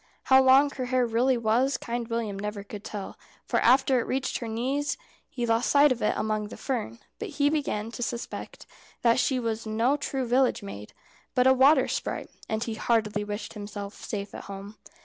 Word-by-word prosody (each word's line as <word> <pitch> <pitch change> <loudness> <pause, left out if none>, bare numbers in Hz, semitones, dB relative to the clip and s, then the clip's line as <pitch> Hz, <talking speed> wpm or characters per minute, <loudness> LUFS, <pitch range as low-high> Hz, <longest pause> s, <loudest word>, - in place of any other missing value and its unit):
How 265 0 +6
long 265 +2 +6
her 255 -2 -4
hair 250 0 +2
really 240 +3 +2
was 240 +4 +2
Kind 235 -1 -4
William 225 -4 -3
never 210 0 -4
could 205 0 -9
tell, 205 -3 -7 0.3
for - - +1
after 260 +1 +4
it - - -3
reached 265 0 -1
her 235 - -5
knees 260 +6 -1 0.3
he 245 - -3
lost 230 +1 +1
sight 285 0 +6
of 245 - -1
it - - +1
among 215 -1 -1
the - - -10
fern; 230 - -3 0.2
but 440 - -4
he 290 0 +3
began 230 -8 -2
to 235 - -7
suspect 235 0 -5 0.4
that 235 +1 +4
she 260 0 +1
was 225 -2 -3
no 230 +6 +2
true 270 -2 -2
village 250 -2 +2
maid, 105 - -8 0.4
but 250 - +4
a 260 - +7
water 265 +2 +5
sprite, - - -3 0.2
and 220 +1 -1
he 230 - -3
heartily 215 -2 0
wished 205 +1 -5
himself 205 -1 -7
safe 200 -1 -6
at - - -8
home. 200 +1 -8
235 Hz, 195 wpm, -27 LUFS, 215-260 Hz, 0.4 s, a